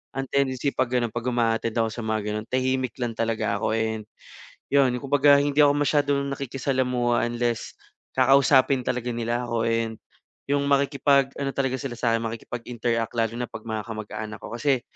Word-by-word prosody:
ang 135 0 -2
tendency 140 0 0
'pag 120 - +1
gano'n 120 -3 0
'pag 120 - -2
uma-attend 115 -2 0
ako 115 - +2
sa 120 - -5
mga 110 0 0
gano'n 105 +1 -4
tahimik 130 0 0
lang 120 -2 -2
talaga 110 -2 -1
ako - - 0
and 110 -1 -1 0.7
yun, 135 -3 +4
kumbaga 140 +1 +5
hindi 145 0 -1
ako 145 - +5
masyadong 145 -1 +2 0.2
nakikisalamuha 130 -3 0
unless 120 -1 -2 0.4
kakausapin 135 -1 +4
talaga 125 -1 -2
nila 120 +1 -1
ako 115 -1 0
and 115 -1 -1 0.5
yung 145 0 +2
makikipag 140 -1 +3
ano 140 - -1
talaga 135 -1 0
sila 130 -2 -4
sa 115 0 +1
akin, 115 - -3
makikipag-interact 115 0 -3
lalo 115 0 0
na 125 - -2
'pag - - -9
mga 110 -1 -3
kamag-anak 110 0 -6
ko - - -8
kasi 130 +1 +1
120 Hz, 170 wpm, -25 LUFS, 115-135 Hz, 0.7 s, kumbaga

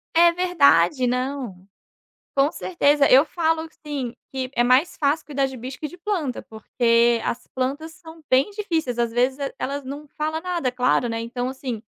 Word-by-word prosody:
É 340 +1 +7
verdade. 280 - +3
Não, 250 -7 -3 0.7
com 280 +3 +3
certeza, 290 -5 +2
eu 270 +4 +7
falo, 320 0 0
assim, 290 -6 -6 0.2
que 260 -1 -4
é 240 - +3
mais 255 +7 +3
fácil 295 +1 +1
cuidar 275 -2 -1
de 265 -1 -7
bicho 255 +3 -7
que 305 - -4
de 355 - -12
planta 345 -8 -3
porque 230 +1 +1
as 235 - -3
plantas 280 +5 -3
são 320 0 -14
bem 260 +9 +3
difíceis 330 - -2
às 235 -1 +1
vezes 255 +3 +1 0.2
elas 280 +1 -3
não 285 +3 -7
fala 310 +2 -3
nada 345 -7 -1
claro, 250 -1 +1
né, 230 0 -3
então 245 +2 -3
assim, 260 -4 -5
275 Hz, 170 wpm, -23 LUFS, 250-320 Hz, 0.7 s, É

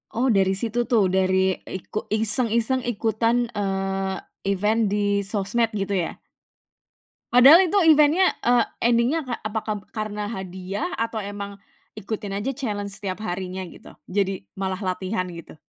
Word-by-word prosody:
Oh 245 +4 0
dari 195 -5 +3
situ 235 +2 0
tuh, 215 -5 +4
dari 190 0 +2
iku 190 +3 -5
iseng-iseng 230 +3 +1
ikutan, 230 +1 +1
eee, 195 -1 -1 0.4
event 210 +4 +1
di 205 -1 +1
sosmed 210 +3 0
gitu 200 -2 -2
ya? 175 -3 0 1.2
Padahal 275 +9 +9
itu 405 - +4
event-nya, 310 +4 +6 0.2
eee, 240 -1 +4 0.3
endingnya 245 +7 +2 0.2
apakab 215 -1 -4
karena 210 -1 -3
hadiah 190 - -4
atau 230 0 -2
emang 200 0 -6 0.4
ikutin 205 -1 -5
aja 205 +7 -1
challenge 210 -7 -4
setiap 200 0 -4
harinya 185 -1 -4
gitu, - - -14 0.2
jadi 195 -1 0 0.2
malah 190 -1 -2
latihan 185 +1 -1
gitu? 170 -2 -10
205 Hz, 130 wpm, -24 LUFS, 195-235 Hz, 1.2 s, Padahal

